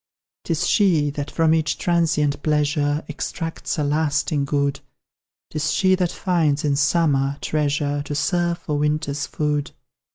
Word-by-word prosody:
'Tis - - 0
she 165 -9 +3
that 145 0 -5
from 160 -1 +2
each 160 -1 0
transient 165 -4 +1
pleasure 150 0 +1
Extracts 165 +3 -4
a 150 - 0
lasting 150 0 0
good; 140 0 0 0.7
'Tis 155 -1 -1
she 190 +3 +3
that 180 -2 +1
finds, 160 -6 0
in 145 -1 +2
summer, 140 -2 +2
treasure 145 -1 -1
To 145 - -4
serve 170 +3 0
for 150 -4 -3
winter's 150 -1 -1
food. 150 -1 -1
150 Hz, 135 wpm, -22 LUFS, 145-165 Hz, 0.7 s, she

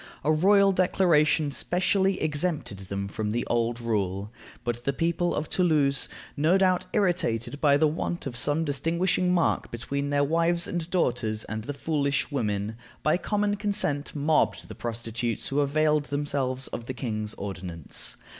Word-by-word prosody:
A 155 - +3
royal 195 +5 +5
declaration 165 -5 +3
specially 190 +5 +1
exempted 150 - -1
them 100 +1 -4
from 105 +1 -3
the 120 +2 -1
old 120 0 0
rule. 105 -3 -2 0.3
But 120 0 -3
the 140 - 0
people 170 +3 0
of 150 - -2
Toulouse, 150 -6 +2 0.3
no 160 +6 +3
doubt 185 -2 +2
irritated 145 - 0
by 145 -2 +5
the 155 - +4
want 165 +3 -2
of 130 -3 -4
some 145 +6 +1
distinguishing 170 +5 +1
mark 175 -2 +1
between 140 +4 -3
their 145 0 +2
wives 170 +3 +2
and 175 -1 -3
daughters 120 -11 0
and 110 0 -5
the 145 - -3
"foolish 140 -2 0
women," 105 -4 -2 0.3
by 155 - +3
common 205 +1 0
consent 195 -9 -1
mobbed 150 +2 +1
the - - -6
prostitutes 115 0 -3
who 140 - 0
availed 150 +1 +2
themselves 140 -3 -2
of 115 - -6
the 130 - -4
king's 110 -3 -3
ordinance. 90 -5 -4
145 Hz, 155 wpm, -27 LUFS, 120-170 Hz, 0.3 s, royal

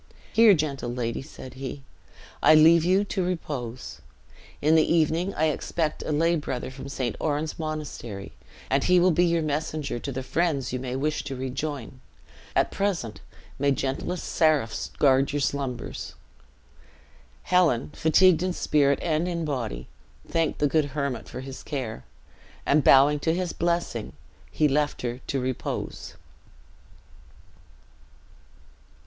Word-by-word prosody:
"Here, 220 -3 +7
gentle 140 -6 -2
lady," 120 -2 -3
said 130 -1 -11
he, 135 +1 -7 0.6
"I 155 - +7
leave 160 +1 +7
you 185 +3 +3
to 195 -2 -2
repose. 140 -9 -4 0.6
In 155 +2 +3
the 160 -1 +4
evening 165 +3 +2
I 155 +1 +2
expect 155 +1 -2
a - - -3
lay 165 +3 +2
brother 130 -5 -4
from 135 +1 -9
St. 130 -4 -2
Oran's 155 +1 -2
Monastery, 150 -10 -5 0.4
and 135 +1 +1
he 180 0 +5
will 180 +1 +4
be 175 +2 +3
your 170 -1 +1
messenger 150 -3 -2
to 140 - -5
the 130 0 -4
friends 140 -4 -1
you 130 - -1
may 125 0 -4
wish 150 +3 -1
to 135 -2 -4
rejoin. 130 0 -5 0.5
At - - +2
present, 180 - -2 0.4
may 140 +1 +2
gentlest 135 +6 -2
seraphs 150 -8 +1
guard 135 0 +3
your 145 - 0
slumbers!" 135 -3 -3 1.3
Helen, 165 -9 +2
fatigued 170 +1 +4
in 185 0 0
spirit 140 -4 +2
and 165 0 0
in 170 -2 -2
body, 120 - -3 0.4
thanked 165 -2 0
the - - +1
good 155 +1 +2
hermit 140 -5 -2
for 130 - -6
his 135 0 -8
care; 125 - -5 0.6
and 145 0 +3
bowing 145 +2 +6
to 160 +3 0
his 180 -1 -2
blessing, 170 - -1 0.4
he 155 - +2
left 145 0 0
her 120 0 -3
to 135 - -1
repose. 130 -1 -4
150 Hz, 140 wpm, -26 LUFS, 130-165 Hz, 1.3 s, Here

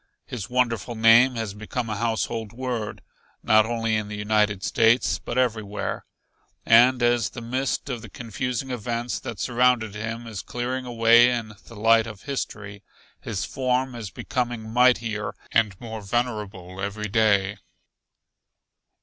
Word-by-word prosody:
His 120 -8 -6
wonderful 120 -1 0
name 115 +3 +6
has 110 -4 -3
become 110 +3 -4
a 105 - -3
household 115 0 -2
word, 120 -4 -4 0.4
not 110 0 +5
only 115 -1 0
in 105 -1 -2
the 105 0 -6
United 105 -1 +1
States 115 +3 +3
but 120 - -5
everywhere. 110 -5 -1 0.6
And 120 +2 +6
as 120 -3 +2
the 115 - -8
mist 130 +5 -2
of 125 -4 -4
the 115 - -10
confusing 125 +4 -4
events 120 0 -3
that 115 - -7
surrounded 120 -3 +2
him 110 +2 -5
is 110 -4 -6
clearing 125 +1 -4
away 120 0 +5
in 115 -3 -3
the 115 - -12
light 115 +1 +4
of 105 -3 -10
history, 105 -7 -5 0.4
his 105 -4 -4
form 130 0 -1
is 115 -4 -6
becoming 120 +1 -3
mightier 120 -4 +2 0.2
and 105 -5 +1
more 110 -2 -7
venerable 100 -4 -3
every 105 +2 -3
day. 100 -2 +2
115 Hz, 140 wpm, -24 LUFS, 105-120 Hz, 0.6 s, name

